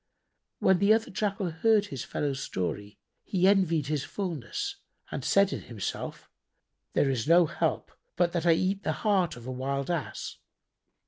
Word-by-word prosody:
When 190 -2 +3
the 200 +2 +5
other 225 - -2
Jackal 195 -2 -1
heard 210 +5 +3
his 135 - -5
fellow's 140 -2 -2
story, 100 +3 -4 0.3
he 185 -1 +2
envied 175 -7 +3
his 145 -1 -1
fulness 395 - -4 0.3
and - - -4
said 195 0 +3
in - - -4
himself, 115 -6 -5 0.7
"There 135 - +3
is 130 0 -2
no 170 +1 +6
help - - -1 0.2
but 175 -1 +2
that 170 -1 -1
I 165 - +7
eat 190 +4 0
the - - -1
heart 190 -7 +2
of 120 -1 -11
a 130 - -4
wild 135 +4 -2
Ass." 165 -5 -4
170 Hz, 165 wpm, -28 LUFS, 140-195 Hz, 0.7 s, I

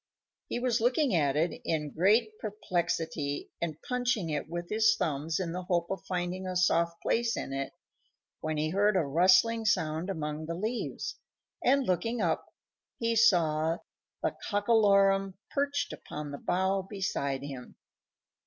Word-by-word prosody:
He - - -2
was 240 -2 +1
looking 250 +2 +2
at 145 -5 +2
it 165 +3 0
in 150 -3 -2
great 215 +6 +3
perplexity, 170 -7 -2
and 160 -3 -3
punching 245 -9 0
it 150 +1 -3
with 175 +1 -4
his 220 +2 +3
thumbs 155 +2 -1
in 175 -3 -2
the 180 +2 -3
hope 175 -1 -1
of 195 - -3
finding 180 +1 -2
a 185 - -3
soft 170 -1 +2
place 230 0 +1
in 135 - -4
it, 135 0 -3 0.7
when 155 0 -2
he 155 +1 0
heard 205 +2 +3
a 165 - +2
rustling 185 +10 +4
sound 160 -4 0
among 155 -3 -3
the 165 - -3
leaves, 220 +7 -3 0.4
and, 275 +1 +4
looking 230 +6 0
up, 170 -6 0 0.5
he 230 0 0
saw 165 -7 +3 0.5
the - - 0
Cockalorum 200 -2 +3 0.2
perched 285 0 -1
upon 150 -1 -7
the 140 - -6
bough 190 +2 +1
beside 185 -9 -2
him. 135 -3 -8
180 Hz, 150 wpm, -30 LUFS, 160-215 Hz, 0.7 s, rustling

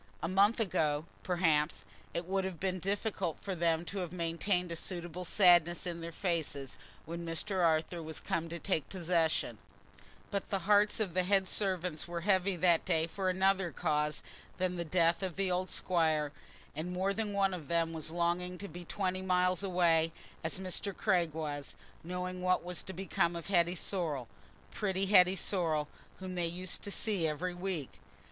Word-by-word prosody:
A - - +1
month 200 +6 +4
ago, 155 -7 +1 0.2
perhaps, 155 - +1 0.3
it 170 - -3
would 190 +1 0
have 185 -4 -4
been 185 -1 -1
difficult 195 -2 -1
for 195 - -4
them 170 -1 +1
to 200 +3 -4
have 175 -3 -3
maintained 175 +1 -1
a - - -2
suitable 175 +1 -4
sadness 175 -2 +5
in 170 -1 -4
their 165 0 -5
faces, 160 -7 -2 0.3
when 170 +2 -5
Mr. 175 +3 -1
Arthur 165 +1 +2
was 160 0 -4
come 165 0 -2
to 170 - -4
take 165 -5 -1
possession; 170 -3 0 0.7
but 200 -1 -2
the 195 - +1
hearts 210 +1 +4
of 200 -6 -1
the 185 - +3
head 190 +1 +2
servants 180 -5 -1
were 170 0 -4
heavy 190 0 +2
that 170 -1 +3
day 160 0 +2
for 185 +3 -2
another 190 0 +2
cause 150 -2 0 0.3
than 185 -1 0
the 170 - -2
death 170 +1 +2
of 185 -3 -3
the 195 -1 0
old 180 +1 0
squire, 155 -4 +1 0.4
and 160 +4 -3
more 190 +2 0
than 215 0 -2
one 195 -1 +2
of 165 -6 -6
them 165 -1 +1
was 160 -1 -4
longing 175 +2 -1
to 200 - -6
be 175 -2 -8
twenty 185 +1 -2
miles 180 -1 +2
away, 170 -4 +3 0.3
as 160 - -2
Mr. 190 +1 -2
Craig 180 -6 +2
was, 145 -3 -4 0.3
knowing 180 +1 -4
what 185 0 +2
was 180 -1 -2
to - - -7
become 185 -2 0
of 170 +2 -6
Hetty 175 -2 +3
Sorrel—pretty 175 - -3
Hetty 190 -1 +6
Sorrel—whom 175 +1 -2
they 175 -2 0
used 180 +2 -3
to - - -6
see 200 -5 0
every 165 +4 -2
week. 175 -6 -4
180 Hz, 175 wpm, -33 LUFS, 165-190 Hz, 0.7 s, Hetty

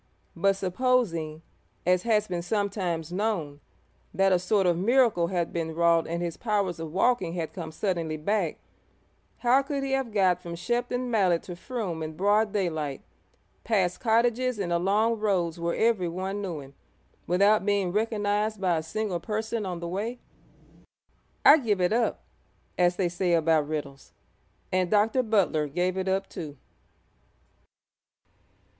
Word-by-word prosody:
But 195 +3 +2
supposing, 185 -6 0 0.4
as 180 0 +3
has 215 -1 +1
been 175 -2 -3
sometimes 180 -4 -2
known, 180 -8 -2 0.6
that 195 0 +3
a 180 - +4
sort 190 +2 +1
of 175 -1 +3
miracle 215 -2 +3
had 175 -2 -2
been 160 -1 -3
wrought 170 0 +3
and 170 +1 -2
his 170 -2 -4
powers 200 -7 -1
of 160 -1 -5
walking 190 -2 +1
had 165 -3 -4
come 165 -4 -6
suddenly 165 -3 -2
back, 180 +1 -1 0.8
how 250 +3 +4
could 275 0 -3
he 270 - -3
have 270 -3 0
got 185 -4 +2
from 170 -1 -6
Shepton 245 +6 -2
Mallet 185 -6 +2
to 175 - -7
Frome 185 -4 -4
in 155 0 -5
broad 205 +2 +2
daylight, 160 -8 -2 0.6
past 190 -6 +1
cottages 240 +1 +2
and 180 -4 -2
along 210 +6 +2
roads 180 -6 0
where 170 0 -1
everyone 190 -3 0
knew 175 -7 -4
him, 135 0 -13 0.5
without 200 +4 +4
being 200 -3 +1
recognised 210 0 0
by 180 -3 +1
a - - -1
single 185 +2 -3
person 220 +2 -3
on 175 -2 -5
the 170 - -4
way? 210 +8 -3 1.3
'I 310 - +9
give 215 -7 0
it 180 +3 +2
up,' 235 0 0 0.5
as 175 0 +3
they 185 - +1
say 175 0 0
about 160 -2 +3
riddles; 145 -3 -6 0.6
and 185 -1 +1
Dr. 215 +4 +3
Butler 195 -10 +1
'gave 180 +5 -1
it 190 0 -2
up,' 190 +1 0
too. 150 -4 -8
185 Hz, 150 wpm, -27 LUFS, 170-215 Hz, 1.3 s, I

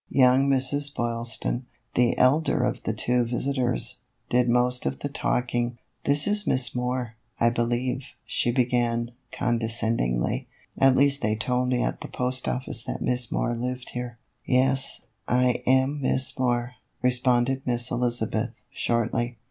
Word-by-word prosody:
Young 130 +1 +4
Mrs. 140 +2 +1
Boylston, 120 +1 -1 0.3
the 120 -1 +2
elder 145 +5 +3
of - - -1
the - - +1
two 125 0 +1
visit 130 +3 -1
ors, 125 -1 0 0.3
did 125 0 +3
most 125 - +2
of 70 0 -2
the - - -2
talking. 120 -1 -1
" - - -47
This 145 +1 +3
is 210 0 +2
Miss 130 -2 +3
Moore, 125 -1 -2 0.3
I 115 0 +4
believe," 120 +2 -1 0.2
she 120 - 0
began, 120 -1 +1 0.2
condescendingly; 115 - 0 0.2
" - - -32
at 135 -1 +6
least 140 0 +3
they 105 +1 +1
told 125 +2 0
me 125 -1 +1
at - - -2
the - - -5
post 125 0 -2
office 125 -2 -2
that - - -4
Miss 125 -1 +2
Moore 120 - 0
lived 125 +2 -4
here." 125 -1 -5 0.3
"Yes, 130 +1 +1 0.2
I 125 0 +2
am 130 +3 +3
Miss 130 0 0
Moore," 125 0 0 0.3
responded 125 +1 +2
Miss 120 -1 -1
Eliza 120 -1 0
beth, 110 +2 -2 0.2
shortly. 120 +1 -1
125 Hz, 155 wpm, -26 LUFS, 120-130 Hz, 0.3 s, at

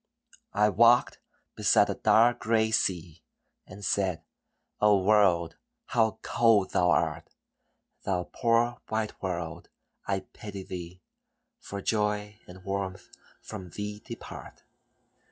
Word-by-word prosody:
I 105 +1 +4
walked 120 +4 +4 0.4
beside - - +3
a - - -1
dark 120 +2 +4
gray 110 -1 +1
sea, 85 -6 -1 0.5
And 100 +1 -9
said, 95 -4 0 0.6
"O 105 -1 +5
world, 95 -5 +3 0.3
how 110 -2 +1
cold 115 -5 +3
thou 90 0 +2
art! - - 0 0.7
Thou 90 -2 -1
poor 120 +1 +1
white 110 -1 -3
world, 85 -3 -4 0.4
I 95 -1 0
pity 100 -4 -9
thee, 90 -1 -8 0.6
For 100 -1 -7
joy 105 -1 -1
and 95 +1 -13
warmth 95 -1 -4 0.3
from 90 -1 -8
thee 105 +3 -6
depart. - - -10
100 Hz, 115 wpm, -28 LUFS, 90-110 Hz, 0.7 s, O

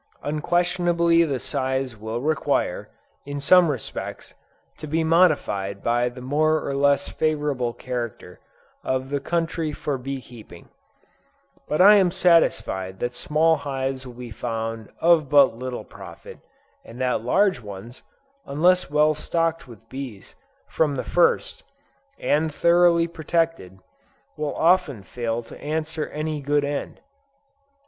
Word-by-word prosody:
Unquestionably 170 +2 +2
the 145 -5 -1
size 130 0 -2
will 110 +2 -5
require, 155 0 -1 0.3
in 145 0 -5
some 175 +5 +5
respects, 130 -6 -6 0.5
to 155 - -7
be 160 +2 0
modified 150 - +2
by 120 +1 +1
the 125 +1 -11
more 155 +4 +1
or 140 - -2
less 140 0 +2
favorable 145 -6 -1
character 120 -7 -6 0.4
of 130 +1 -2
the 145 - 0
country 165 +1 -2
for 145 -2 -3
bee 135 +2 -5
keeping; 115 -9 -14 1.0
but 150 - -1
I 205 +2 +8
am 190 -3 +4
satisfied 165 - +2
that 120 0 -2
small 155 +5 +2
hives 135 -2 -4
will 125 - -11
be 120 -1 -9
found 115 -1 -4
of 165 -4 +4
but 140 -5 +5
little 125 +1 -5
profit, - - -12 0.4
and 115 +2 -12
that 125 -3 0
large 190 - +2
ones, 105 +3 -10 0.4
unless 175 +5 +2
well 150 +1 +3
stocked 165 0 -2
with 115 -2 -15
bees, 130 -7 -8 0.3
from 150 -3 0
the 130 - -3
first, 175 -1 +1 0.6
and 155 +2 0
thoroughly 170 +1 +4
protected, 165 - -2 0.6
will 150 -1 -3
often 165 - +2
fail 120 +1 -3
to - - -13
answer 155 +1 -3
any 155 0 -4
good 145 +1 +1
end. 145 0 -4
145 Hz, 130 wpm, -23 LUFS, 125-165 Hz, 1.0 s, I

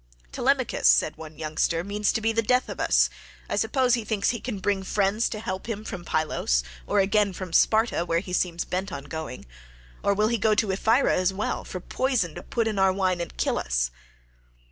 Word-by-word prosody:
"Telemachus," - - +1
said - - +4
one 155 -1 -11
youngster, 160 +2 -1
"means 205 +2 0
to 225 - -1
be 225 +1 +2
the 225 0 +1
death 250 +3 +1
of - - -6
us; - - +4 0.4
I - - -2
suppose 260 -3 +2
he 235 -2 +1
thinks 210 -2 0
he 235 - -4
can 240 -3 -4
bring 195 0 0
friends 200 +3 +1
to 215 - -5
help 190 0 -5
him 215 -1 -3
from 180 -5 -6
Pylos, 150 - 0 0.2
or - - +2
again 200 0 +2
from 180 -2 -7
Sparta, 220 -3 +3
where 165 -1 0
he 180 +1 -4
seems 175 -2 0
bent 190 +2 -3
on 140 -2 -5
going. 155 -2 -7 0.6
Or 200 - +2
will 210 +2 +2
he 235 -1 0
go 215 +1 +3
to 210 -1 +1
Ephyra 225 +7 +3
as 185 +1 +2
well, 205 +3 -2
for 185 - -6
poison 230 - -1
to - - -7
put 230 -2 -1
in 215 -3 -1
our 190 0 +5
wine 185 -2 0
and 170 - -7
kill - - 0
us?" - - -1
195 Hz, 210 wpm, -26 LUFS, 170-220 Hz, 0.6 s, our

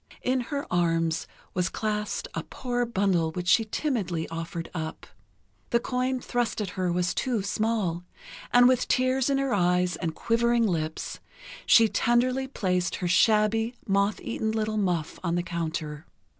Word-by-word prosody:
In 255 +1 +1
her 280 +3 -4
arms 165 -2 +1 0.3
was 180 0 0
clasped 210 -1 -2
a - - -2
poor 245 -1 -3
bundle 190 -7 +1
which 180 0 -4
she 225 +4 +5
timidly 210 - -2
offered 165 0 -5
up. 160 -2 -5 0.6
The 235 - +3
coin 255 +1 -1
thrust 245 -2 -1
at 200 -3 -3
her 185 -1 -1
was 180 +1 0
too 240 -6 -1
small, 200 -4 -1 0.5
and 245 0 +7
with 255 -1 +2
tears 255 +1 +2
in 275 - +2
her 275 -2 0
eyes 180 -2 +2
and 165 -3 -3
quivering 235 0 +2
lips, 160 -5 -2 0.5
she 225 -1 +7
tenderly 250 +4 +1
placed 180 -8 -1
her 180 - -2
shabby, 220 +5 +3
moth 200 +1 +1
eaten 220 -2 -2
little 215 0 -1
muff 175 -6 -1
on 170 -1 0
the 175 - 0
counter. 160 -2 -4
205 Hz, 155 wpm, -27 LUFS, 175-240 Hz, 0.6 s, and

